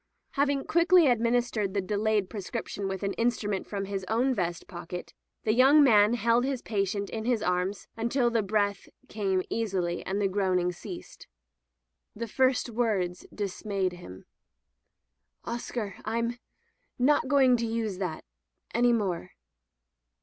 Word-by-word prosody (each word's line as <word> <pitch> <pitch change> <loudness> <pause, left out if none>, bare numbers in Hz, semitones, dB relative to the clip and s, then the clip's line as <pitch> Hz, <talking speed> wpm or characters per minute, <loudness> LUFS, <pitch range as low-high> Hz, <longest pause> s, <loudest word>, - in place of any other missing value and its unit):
Having 280 -1 +1
quickly 345 0 +5
administered 235 -4 +1
the - - +2
delayed 210 +1 0
prescription 200 0 -5
with 190 0 -4
an 200 - -1
instrument 215 -4 0
from 200 -1 -3
his 195 -1 -4
own 245 +5 +2
vest 175 -6 -2
pocket, 175 -2 -7 0.3
the 215 - +2
young 270 +5 +7
man 215 -3 +5
held 235 +1 +2
his 265 -2 -2
patient 200 -1 -1
in 220 -1 -4
his 240 -3 +1
arms 180 +2 -1
until 235 +2 +1
the 230 -1 +2
breath 205 0 -1 0.2
came 195 -3 0
easily 185 -6 -1
and 195 +2 -2
the 200 - +2
groaning 185 -2 +1
ceased. 180 +1 -10 0.9
The 230 +2 -4
first 260 +4 +2
words 210 -7 -1
dismayed 200 -2 -2
him. 95 - -11 0.6
*' - - -42
Oscar, 235 -3 -4
Fm 235 +2 -2 0.3
— - - -46
^not 275 +2 +3
going 260 -2 +5
to 230 0 -1
use 225 -4 -2
that 180 -5 -4 0.3
— - - -30
any 240 +1 +4
more." 190 - -2
210 Hz, 145 wpm, -28 LUFS, 190-240 Hz, 0.9 s, young